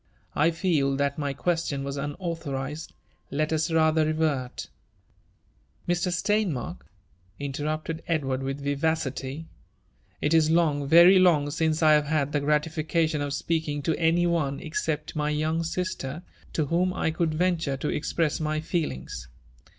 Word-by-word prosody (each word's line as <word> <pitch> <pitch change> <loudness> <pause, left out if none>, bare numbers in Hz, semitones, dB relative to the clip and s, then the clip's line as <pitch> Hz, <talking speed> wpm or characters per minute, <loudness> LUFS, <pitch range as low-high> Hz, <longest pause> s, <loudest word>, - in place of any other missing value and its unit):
'* - - -37
I - - +5
feel 160 -5 +1
that 140 +1 -1
my 145 -1 -1
question 150 -2 -1
was 140 0 -4
upautborii^d. 150 -1 -4 0.4
Let 155 +3 -1
us 160 +2 +1
rather 160 -1 +3
revert." 155 -5 -1 0.6
*' - - -37
Mr^ 175 +1 +1
Steinmarkl" 185 - -1 0.6
interrupted 155 +3 -3
Edward 135 -5 0
with 135 +1 -4
yivarily, 145 0 -1 0.8
'^itif 155 +1 +4
loig, 155 -4 +2
very 170 +5 +8
long, 155 -6 +4
since 160 +1 0
I 155 - +7
have 150 -1 +4
bad 145 -2 0
the 150 - +1
gratification 155 +1 0
of 145 0 -2
speaking 150 -1 -1
to 160 +2 0
any 170 +1 +3
om^ 155 -5 0
ncept 155 -1 -3
my 150 -1 0
young 155 +2 0
sister, 165 -3 -3 0.3
to 155 - +1
whom 180 +5 +1
I 160 - 0
could 160 -1 -1
venture 165 -5 0
to 150 - -3
expr^i 160 0 -1
^y 155 0 0
fetl 160 0 -1
ings. 65 -1 -8
155 Hz, 145 wpm, -26 LUFS, 145-165 Hz, 0.8 s, very